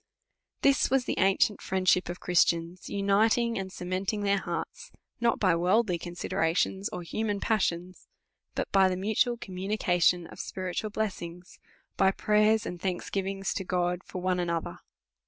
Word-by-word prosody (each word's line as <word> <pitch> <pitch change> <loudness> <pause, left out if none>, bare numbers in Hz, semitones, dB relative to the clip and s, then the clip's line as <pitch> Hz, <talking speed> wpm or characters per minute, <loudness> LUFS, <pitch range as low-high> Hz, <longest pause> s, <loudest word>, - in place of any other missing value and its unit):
This 275 0 +4
was 265 -1 +2
the - - -2
ancient 195 +2 +3
friendship 185 -1 +1
of 175 - -5
Christians 170 0 +1
unit 200 +3 +3
ing 235 -3 0
and 190 -1 -5
cementing 185 +4 -3
their 200 -1 +2
hearts, 475 - -5 0.3
not 235 0 +2
by 185 -5 +3
worldly 180 +2 +2
consi 175 +1 -6
derations, 190 +5 0
of 180 - -6
human 205 +3 -2
passions, 185 -5 -1 0.5
but - - -3
by 190 -1 +5
the 185 - -2
mutual 220 +5 +1
com 190 - -9
munications 180 -3 +1
of - - -12
spiritual 185 +3 -4
blessings, 180 -5 -5 0.4
by 190 - +5
prayers 215 +2 +2
and 175 -1 -6
thanksgiving's 195 +1 -2
to 190 - -3
God 180 0 -1
for 185 - -7
one 185 -1 +1
another. 170 -2 -2
190 Hz, 155 wpm, -28 LUFS, 180-210 Hz, 0.5 s, by